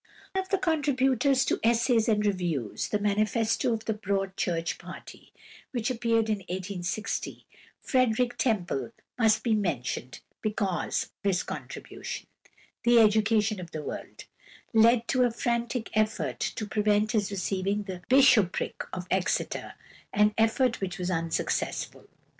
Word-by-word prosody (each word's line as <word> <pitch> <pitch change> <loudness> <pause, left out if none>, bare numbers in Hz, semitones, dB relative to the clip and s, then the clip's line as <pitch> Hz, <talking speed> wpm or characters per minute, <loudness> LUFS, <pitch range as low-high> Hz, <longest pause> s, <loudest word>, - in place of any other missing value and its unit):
Of 380 0 -2
the 390 - +2
contributors 275 -6 +2
to - - 0
"Essays 230 0 +3
and 210 -1 +2
Reviews," 175 - -1
the 210 - +1
manifesto 215 +4 +1
of 225 -1 -2
the 220 - 0
Broad 195 -2 -2
Church 165 -3 -1
party, - - -11 0.4
which 240 0 -1
appeared 230 -2 +1
in 215 -1 +1
1860, 185 +2 -4 0.4
Frederick 250 -1 +2
Temple 215 - 0 0.3
must 220 -2 +4
be 230 - +2
mentioned, 135 - -2 0.2
because 205 -5 -1
his 190 -3 +1
contribution, - - -7 0.6
"The 240 0 +5
Education 215 -1 +4
of 175 -2 -7
the 155 -2 -6
World," - - -7 0.5
led 230 +1 +5
to 255 - +2
a 245 - +5
frantic 235 0 -2
effort 215 0 0
to 215 - -2
prevent 210 +1 +1
his 210 -3 +1
receiving 195 +1 -1
the 185 -3 -7
bishopric 255 -8 +4
of 180 -1 -5
Exeter, 185 -1 -1 0.4
an 210 +1 +3
effort 225 +2 +2
which 185 -2 -3
was 180 0 -2
unsuccessful. 165 -1 -2
215 Hz, 130 wpm, -28 LUFS, 190-235 Hz, 0.6 s, The